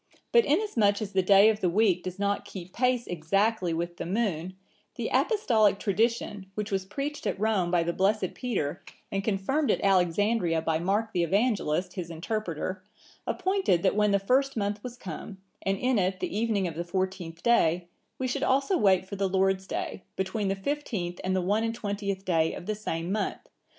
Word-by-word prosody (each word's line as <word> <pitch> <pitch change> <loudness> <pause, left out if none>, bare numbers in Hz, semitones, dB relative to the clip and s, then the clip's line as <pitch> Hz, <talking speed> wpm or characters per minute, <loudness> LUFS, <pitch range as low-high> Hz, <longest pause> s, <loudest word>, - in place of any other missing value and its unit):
But 470 -1 +5
inasmuch 245 - +2
as 210 -3 -5
the 190 - +3
day 195 +2 +6
of 215 -1 0
the 185 - +1
week 190 -1 +3
does 185 0 -6
not 200 0 0
keep 185 -1 -9
pace 250 -1 +1
exactly 185 +3 0
with 170 +1 -3
the - - -4
moon, 185 -3 -1 0.4
the - - -3
Apostolic 225 - +3
tradition, 210 -1 0
which 210 0 -3
was 190 -1 -1
preached 280 +9 -4
at - - -2
Rome 205 -5 +1
by 175 -1 +2
the 170 +1 -1
blessed 195 0 +1
Peter, 200 - -3 0.3
and 195 0 -1
confirmed 220 +9 0
at - - +3
Alexandria 185 -2 +2
by 160 -1 +1
Mark 205 +5 0
the 175 - +1
Evangelist,(963) 190 -3 +1
his 180 -4 -5
interpreter, 185 0 -3 0.4
appointed 375 - +1
that 195 - +3
when 210 0 +3
the 200 - +4
first 260 +7 +1
month 205 0 -1
was 245 -1 -7
come, 190 -1 -7 0.2
and 195 0 0
in 250 +1 +1
it 185 0 0
the - - -3
evening 215 -3 +1
of 165 - -4
the 170 +2 -3
fourteenth 180 -2 -3
day, 175 -7 +3 0.3
we 260 - -1
should 255 - -2
also 275 +7 +2
wait 190 -2 +4
for 200 +1 -7
the 195 -1 0
Lord's 190 0 +1
day, - - -4
between 190 +2 -1
the 195 - 0
fifteenth 195 -6 -3
and 185 0 0
the 185 - +1
one 205 +5 +1
and 230 0 -1
twentieth 200 -3 -3
day 165 -3 +1
of - - -8
the 215 - -1
same 175 -4 -3
month. 210 0 -2
195 Hz, 190 wpm, -28 LUFS, 180-220 Hz, 0.4 s, day